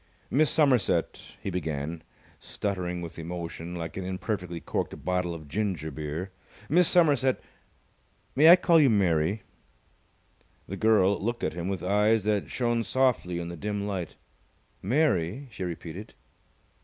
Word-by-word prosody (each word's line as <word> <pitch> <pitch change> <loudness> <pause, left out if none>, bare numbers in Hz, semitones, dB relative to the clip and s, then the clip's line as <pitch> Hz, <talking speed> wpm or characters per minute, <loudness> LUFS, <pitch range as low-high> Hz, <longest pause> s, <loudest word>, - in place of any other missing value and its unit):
"Miss 150 +2 +4
Somerset 125 - +2 0.2
" - - -31
he 95 - -2
began, 80 -2 -3 0.4
stuttering 90 -3 -3
with 85 0 -8
emotion 85 0 -6
like 85 -2 -5
an 95 - -3
imperfectly 90 -2 -3
corked - - -4
bottle 90 -2 0
of 80 -2 -10
ginger 90 -3 -2
beer. 80 +6 -5 0.4
"Miss 175 +5 +4
Somerset 145 -8 +3 1.0
may 155 +5 +7
I 175 - +12
call 175 -2 +4
you 145 -4 +5
Mary?" 95 -1 +2 1.2
The 95 - -5
girl 100 -2 +3
looked 120 +2 -2
at - - 0
him 85 0 -4
with 95 -3 -3
eyes 105 +3 +3
that 105 -1 0
shone 120 -2 0
softly 115 -6 +1
in 85 0 -4
the 85 - -6
dim 100 +3 -3
light. 95 -5 -4 0.7
"Mary?" 125 - +1
she 100 - -6
repeated. 90 +3 -7
95 Hz, 145 wpm, -27 LUFS, 85-115 Hz, 1.2 s, I